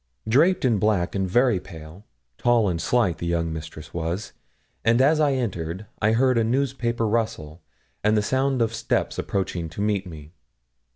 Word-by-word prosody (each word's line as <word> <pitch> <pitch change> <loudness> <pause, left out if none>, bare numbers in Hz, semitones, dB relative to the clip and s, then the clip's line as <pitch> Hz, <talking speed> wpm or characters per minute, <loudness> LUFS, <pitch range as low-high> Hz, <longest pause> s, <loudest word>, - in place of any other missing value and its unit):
Draped 160 +9 +3
in 115 -5 +2
black 100 -4 +1
and 95 -2 -1
very 120 0 +3
pale, 85 +2 -12 0.3
tall 120 -3 +3
and 85 -3 -1
slight, 115 -9 +1
'the 85 - -3
young 85 -1 -1
mistress' 80 0 -8
was; 85 +5 -3 0.5
and 115 +1 +3
as 150 +4 +4
I 145 -2 +3
entered 95 -6 -3 0.2
I 110 +1 +3
heard 125 +1 +3
a - - +2
newspaper 120 -2 0
rustle, 105 -8 -2 0.4
and 105 +1 +3
the 105 - +2
sound 130 +1 +1
of 115 0 -2
steps - - -1
approaching 90 -4 -2
to 85 - -10
meet 100 -2 0
me. 80 -2 -11
105 Hz, 170 wpm, -24 LUFS, 85-120 Hz, 0.5 s, as